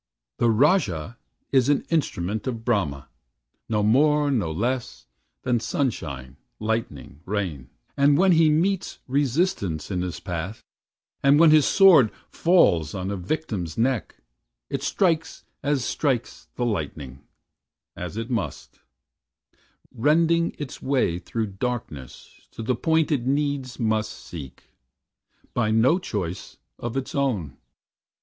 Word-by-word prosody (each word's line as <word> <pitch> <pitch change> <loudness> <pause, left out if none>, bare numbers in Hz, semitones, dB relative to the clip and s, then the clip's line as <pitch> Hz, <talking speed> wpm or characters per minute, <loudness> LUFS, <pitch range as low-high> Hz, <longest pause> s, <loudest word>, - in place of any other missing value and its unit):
"The 120 - +3
Rajah 115 - +2 0.3
is 130 -1 +3
an 145 - +2
instrument 110 - -1
of 115 -3 -4
Brahma, 85 - 0 0.6
No 105 -2 +1
more, 145 +6 +3
no 105 -12 0
less, 115 - -3 0.4
than 125 -2 +1
sunshine, 75 - -3 0.2
lightning, 110 - -3
rain; 90 -11 -3 0.3
And 140 +1 +4
when 190 +2 +5
he 160 -2 +5
meets 175 +5 0
resistance 135 - 0
in 90 -2 -1
his 90 -1 -4
path, 90 +2 -5 0.6
And 140 +2 +5
when 165 -1 +7
his 155 -3 +5
sword 180 - +6 0.2
falls 90 - +3
on 95 +1 -3
a - - -2
victim's 95 - -3
neck, 120 -1 0 0.6
It - - -2
strikes 165 -4 0 0.2
as 140 -4 0
strikes 130 -6 -2
the 120 - -1
lightning 75 - -4 0.7
as 90 +4 -6
it 115 +2 -4
must; 100 - -4 1.1
Rending 165 +6 +2
it 145 -3 -7
way 130 -11 +1
through 115 +4 -3 0.2
darkness 110 - -6
to 115 - -6
the 125 - +1
point 160 +4 +1
It 130 -4 0
needs 140 -2 -1
must 110 -2 0
seek, 70 -7 -10 0.9
by 115 -3 +1
no 120 +11 +4
choice 95 - -5 0.2
of 120 +2 -4
its 135 - -4
own. 110 - -1
120 Hz, 125 wpm, -24 LUFS, 95-145 Hz, 1.1 s, when